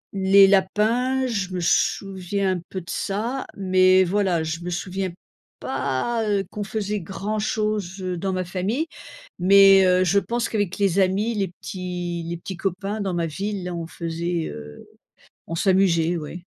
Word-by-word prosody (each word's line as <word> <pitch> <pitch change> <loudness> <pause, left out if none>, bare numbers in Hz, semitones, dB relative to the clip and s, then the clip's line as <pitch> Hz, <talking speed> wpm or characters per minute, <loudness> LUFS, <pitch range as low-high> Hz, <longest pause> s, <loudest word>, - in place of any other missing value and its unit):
Les 195 +1 +6
lapins, 220 +7 +2
je 200 -7 -2
me 180 - -1
souviens 190 +2 0
un - - -8
peu 185 - -5
de 170 - -14
ça, 230 +7 -3
mais 185 -1 +4
voilà, 185 -3 +1
je 160 +1 -3
me 180 - -4
souviens 185 +2 -3 0.5
pas, 225 - -1
heu, 200 -1 +1
qu'on 210 - -4
faisait 210 0 -3
grand-chose, 210 +1 -2
heu, 185 -1 -3
dans 190 +2 -2
ma 185 -1 -2
famille. 195 - -2 0.5
Mais 195 +1 +7
heu, 180 0 +4
je 195 +3 +3
pense 235 +3 -2
qu'avec 205 -5 -1
les 200 -2 +2
amis, 195 +5 +1
les 200 -3 -1
petits 175 -1 -5
les 170 - -3
petits 180 +1 -7
copains 195 +3 -3
dans 190 -3 -2
ma 170 - 0
ville, 190 +3 -4
hein, 180 - -4
on 165 -1 -5
faisait, 170 0 -3
heu 75 0 -10 0.6
on 165 - -5
s'amusait, 175 -2 +2
ouais. 165 +3 -8
190 Hz, 165 wpm, -23 LUFS, 175-205 Hz, 0.6 s, Mais